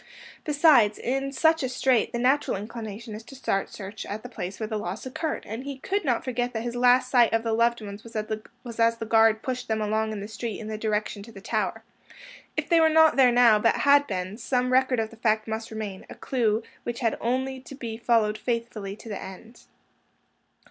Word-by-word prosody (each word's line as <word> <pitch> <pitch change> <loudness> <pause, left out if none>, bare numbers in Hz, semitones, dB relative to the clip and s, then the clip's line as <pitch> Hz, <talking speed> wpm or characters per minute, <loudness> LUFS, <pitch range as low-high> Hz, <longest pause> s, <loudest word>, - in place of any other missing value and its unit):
Besides, 290 -8 +5
in 270 +2 -2
such 320 +4 +3
a 260 - -1
strait, 255 -2 +2
the - - -2
natural 260 0 +2
inclination 220 +1 -7
is 215 - -7
to 270 - -12
start 195 -6 -1
search 200 +1 -8
at 210 +2 -5
the 245 - -8
place 185 -5 -6
where 220 - -2
the 215 -1 -3
loss 200 +3 -5
occurred, 300 +5 -3
and 225 +4 -5
he 280 -1 -6
could 395 +9 -2
not 245 -5 0
forget 245 -1 -2
that 225 -1 -3
his 240 0 -4
last 250 +1 +4
sight 240 -3 +5
of 225 0 +2
the 225 -1 -1
loved 235 +1 +2
ones 205 0 -8
was 225 +1 -6
as 230 0 +3
the 225 - -5
guard 225 0 +4
pushed 255 -1 -3
them 220 -1 0
along 215 +1 0
the 200 - -6
street 220 0 -5
in 215 - -7
the 215 - -3
direction 210 -1 -2
to 225 +3 -11
the 205 - -11
Tower. - - -2 0.7
If - - -1
they 335 -2 +4
were 320 0 +5
not 320 0 +5
there 260 -2 +6
now, 240 -3 +6
but 230 +2 +3
had 285 0 +6
been, 185 +1 -4
some 255 -1 0
record 260 -1 +3
of 220 -1 -2
the 230 - -14
fact 220 -1 +1
must 220 +1 -4
remain, 215 -4 -6
a - - -9
clew 225 -4 0 0.2
which 240 +1 -5
had 230 -2 +1
only 260 +2 -1
to 270 +1 -11
be 235 -4 -5
followed 225 -2 +2
faithfully 230 -4 -3
to 225 - -14
the 205 - -5
end. 190 +5 -11
230 Hz, 215 wpm, -26 LUFS, 215-255 Hz, 0.7 s, there